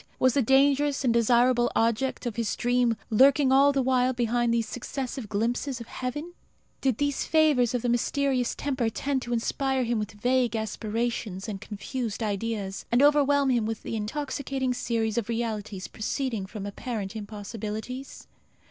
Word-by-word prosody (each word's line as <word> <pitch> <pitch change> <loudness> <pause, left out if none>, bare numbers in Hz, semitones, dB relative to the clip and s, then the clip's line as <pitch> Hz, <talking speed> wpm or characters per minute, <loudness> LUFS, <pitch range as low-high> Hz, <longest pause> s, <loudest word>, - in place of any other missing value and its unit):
was 255 -1 +3
the 280 - +3
dangerous 275 +3 +3
and 245 -3 +3
desirable 240 +1 +3
object 230 +4 0
of 235 -3 -3
his 230 -3 -1
dream 245 -2 +1
lurking 265 +4 +5
all 275 +2 +6
the 275 -1 +1
while 255 0 +2
behind 240 0 +1
these 230 -1 +1
successive 250 0 -5
glimpses 240 +5 -1
of 235 - -7
heaven? 295 +9 -5 0.5
Did 260 -5 +1
these 285 -1 0
favours 290 -7 +3
of 245 - -1
the - - 0
mysterious 255 +1 +1
tempter 260 -5 -1
tend 265 +4 -2
to 240 - -6
inspire 260 +3 0
him 235 -1 0
with 215 +1 -4
vague 245 +2 +1
aspirations 220 -2 -3
and 200 -3 -5
confused 225 +2 -4
ideas, 205 -2 -3
and 240 +3 +4
overwhelm 285 -2 +4
him 235 -3 +1
with 225 -1 -5
an - - -4
intoxicating 260 +3 -2
series 225 -2 -1
of 225 -1 -6
realities 215 -4 -3
proceeding 220 -2 -3
from 205 0 -7
apparent 205 0 -5
impossibilities? 220 +4 -6
240 Hz, 155 wpm, -27 LUFS, 220-265 Hz, 0.5 s, all